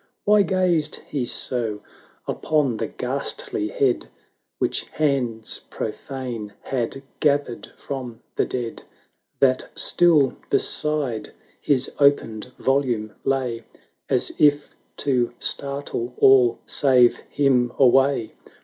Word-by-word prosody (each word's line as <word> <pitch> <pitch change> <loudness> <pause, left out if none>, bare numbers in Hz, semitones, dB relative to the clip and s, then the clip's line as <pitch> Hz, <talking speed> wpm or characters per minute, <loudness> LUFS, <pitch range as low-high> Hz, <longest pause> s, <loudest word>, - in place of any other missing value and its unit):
Why 210 0 +5
gazed 180 -4 +2
he 140 -4 -2
so 115 -4 -1 0.5
upon 145 -7 0
the - - -2
ghastly 105 - -3
head 130 +2 0 0.3
' - - -53
Which - - 0
hands 125 -7 -2
profane 115 -2 -5
had 135 +1 -3 0.2
gathered 140 -5 0
from 125 -4 -6
the - - +1
dead, 120 -2 -4 0.6
That 130 -2 +2
still 160 -6 +3
beside 145 -8 0 0.3
his 135 -3 +1
opened 125 -5 +2
volume 125 -6 0
lay. 125 -4 -1 0.5
As - - +1
if 145 -1 +3 0.2
to 125 -4 0
startle 140 -3 -3
all 125 -3 +5
save 125 -4 +4
him 130 -4 +2
away? 135 -2 +3
130 Hz, 105 wpm, -23 LUFS, 120-145 Hz, 0.6 s, Why